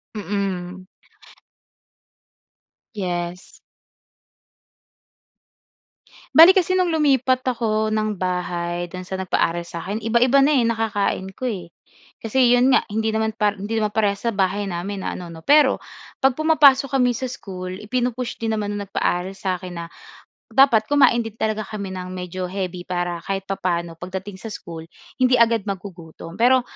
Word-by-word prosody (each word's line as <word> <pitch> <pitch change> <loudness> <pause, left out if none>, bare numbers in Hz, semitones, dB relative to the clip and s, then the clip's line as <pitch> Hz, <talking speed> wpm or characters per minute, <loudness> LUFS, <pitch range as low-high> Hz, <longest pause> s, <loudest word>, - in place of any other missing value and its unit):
Mm. 190 -2 -4 2.1
Yes. 175 -2 -4 2.8
Bale, 340 +5 +9
kasi 370 0 +2
no'ng 345 -3 +1
lumipat 260 -4 +2
ako 220 -3 0
ng 215 -1 0
bahay 175 -1 -2
do'n 185 +1 -8
sa 190 +1 -5
nagpaaral 170 -2 0
sa'kin, 190 +6 -5
iba-iba 235 +4 +3
na 285 +2 +4
eh 245 - +3
nakakain 220 -4 -1
ko - - -11
eh. 195 -9 -3 0.6
Kasi 245 +2 +4
'yon 255 +2 +4
nga - - +6
hindi 220 +1 -1
naman 220 0 -1
par 210 -2 0
hindi 210 +3 -3
naman 215 -1 0
parehas 205 -2 0
sa 235 - +1
bahay 195 0 0
namin 190 +1 -4
na - - -2
ano 180 -1 -7
'no. 165 -1 -11
Pero 290 -2 +4 0.4
'pag 270 - +6
pumapasok 280 -4 +5
kami 250 -2 +3
sa 255 +2 -3
school 185 -6 -7
ipinu-push 245 +1 -2
din 225 -1 -1
naman 205 -1 -2
ng 205 -1 -5
nagpaaral 185 0 -1
sa'kin 185 -2 -4
na 170 0 -5 0.7
dapat 240 -6 +5
kumain 255 -4 +4
din 225 - -6
talaga 215 -1 -2
kami 200 -3 -6
ng 185 0 -6
medyo 180 0 -5
heavy, 180 -1 -5
para 175 -1 -2
kahit 195 0 -2
papaano 170 -3 -2
pagdating 190 +2 -7
sa 220 +1 -8
school 165 -1 -8 0.3
hindi 255 -1 +3
agad 230 -3 +3
magugutom. 180 -3 -8
Pero, 250 +2 +4
205 Hz, 145 wpm, -22 LUFS, 185-240 Hz, 2.8 s, Bale